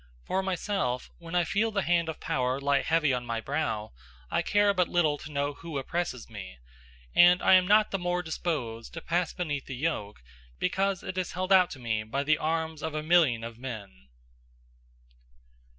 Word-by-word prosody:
For 190 - 0
myself, 185 -9 -2
when 170 0 -7
I 175 - +4
feel 205 +6 +1
the 200 -3 -1
hand 170 -1 +2
of 160 - -5
power 130 +1 -1
lie 140 0 +2
heavy 160 -4 +2
on 125 -1 -1
my 115 -1 -3
brow, 110 -5 -2 0.4
I - - +2
care 205 0 +3
but 180 -2 +2
little 155 -4 +1
to 155 - -9
know 145 0 -1
who 160 0 -7
oppresses 135 -2 -3
me; 100 - -9 0.6
and 175 +1 +7
I - - +6
am 185 -1 +6
not 210 +1 +5
the 195 - -1
more 180 0 -1
disposed 145 -8 -4
to 165 - -5
pass 170 +1 0
beneath 145 -7 -3
the 130 - -5
yoke, 115 - -3 0.3
because 195 +1 0
it 185 - -3
is 185 - -3
held 185 +2 +1
out 185 -2 +6
to - - -15
me 110 -3 -1
by 120 +6 -2
the 155 +1 +2
arms 160 -1 -2
of 160 -1 -4
a 155 - -2
million 155 -9 +4
of 115 0 -7
men. 100 - -8
160 Hz, 190 wpm, -28 LUFS, 125-180 Hz, 0.6 s, and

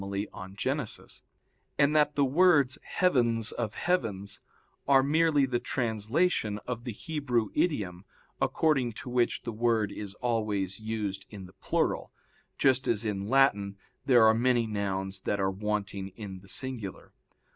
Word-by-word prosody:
iv 100 0 -5
in 100 -1 -5
Gen.), 135 +7 -1 0.9
and 140 +1 +3
that 150 -1 +3
the 140 - +3
words 145 -2 +4
'heavens 120 -10 +2
of 110 -3 -4
heavens' 105 - -1 0.5
are 135 -1 +6
merely 150 0 +3
the 125 -2 -1
translation 115 - 0
of 120 -1 -5
the 120 - -3
Hebrew 125 -3 -1
idiom 100 - -1 0.4
according 135 -7 +2
to 125 - -8
which 120 -1 +1
the 120 - -4
word 110 -2 +1
is 100 -1 -7
always 105 -5 -1
used 105 -3 -4
in 100 -3 -9
the 90 - -15
plural, 95 - -1 0.5
just 135 -1 +3
as 115 -1 +1
in 100 -1 -2
Latin 105 -7 +3 0.3
there 120 -4 +6
are 110 - +6
many 120 0 +2
nouns 95 -2 -2
that 100 +1 -2
are 95 0 +1
wanting 100 -1 -3
in 95 -3 -7
the 100 +1 -16
singular. 120 -5 -5
115 Hz, 145 wpm, -29 LUFS, 100-135 Hz, 0.9 s, are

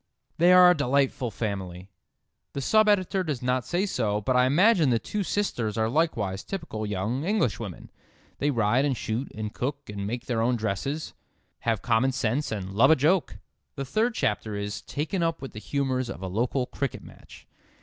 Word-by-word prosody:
"They 175 +2 +6
are 180 0 +8
a - - +3
delightful 135 -3 +1
family." 95 -4 -5 0.7
The 140 - -3
sub 215 +9 +4
editor 190 -1 +2
does 145 -7 -3
not 125 0 0
say 180 +3 0
so, 110 - 0
but 125 +5 0
I 125 0 +5
imagine 175 - +4
the 120 - +3
two 210 - -3
sisters 125 - -1
are 110 0 +2
likewise 115 - 0
typical 110 - -5
young 105 +7 -2
Englishwomen. 120 - -2 0.5
They 145 - +1
ride 120 0 +2
and 140 -4 0
shoot 115 +6 -3
and 105 -1 -5
cook 140 -2 -4
and 100 -1 -4
make 120 +3 -4
their 115 -3 -1
own 120 +2 +2
dresses, 115 +8 -3 0.6
have 115 +1 0
common 125 +1 +2
sense 130 +3 -1
and 95 -3 -4
love 115 +7 +5
a 160 - +7
joke. 150 - +1 0.4
The 135 - -4
third 220 - 0
chapter 105 0 -1
is 100 0 -4
"taken 160 +6 -3
up 165 -1 0
with 135 - -7
the 110 - -7
humours 130 +1 -1
of 100 - -7
a - - -2
local 120 +7 0
cricket 140 0 -4
match." - - -15
125 Hz, 185 wpm, -26 LUFS, 110-155 Hz, 0.7 s, are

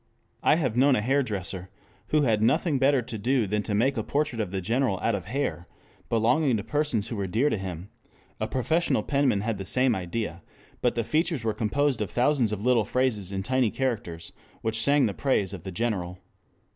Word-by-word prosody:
I - - +4
have 130 -9 -1
known 135 +2 +5
a 105 - +1
hairdresser 105 -8 -1 0.4
who 150 -1 +2
had 110 -5 +2
nothing 140 +6 +2
better 135 -1 +3
to 115 - -6
do 125 +2 +1
than 105 +2 -1
to 105 0 -2
make 130 +6 +2
a - - -1
portrait 145 -6 -1
of 105 - -3
the 95 +1 -3
General 115 +1 0
out 115 - 0
of 95 -3 -3
hair 110 -6 -3 0.4
belonging 120 +3 +2
to 100 - -4
persons 145 -8 -1
who 115 - -4
were 100 -2 -2
dear 120 +11 +1
to - - 0
him; 95 +1 -6 0.5
a - - -1
professional 160 +7 0
penman 140 -8 +1
had 110 -1 -2
the - - -3
same 130 +5 +2
idea, 95 -1 -4 0.4
but 125 - +1
the 115 - 0
features 155 +1 0
were 110 -1 0
composed 130 +3 0
of 105 - -2
thousands 125 -3 +2
of 105 +1 -4
little 125 -3 +4
phrases 110 -4 -1
in 95 0 -3
tiny 130 +1 +2
characters 110 -11 -3 0.3
which 110 0 0
sang 140 +2 +4
the 105 - -1
praise 105 -9 0
of - - -8
the 95 - -4
General. 90 -3 -2
115 Hz, 205 wpm, -26 LUFS, 100-135 Hz, 0.5 s, known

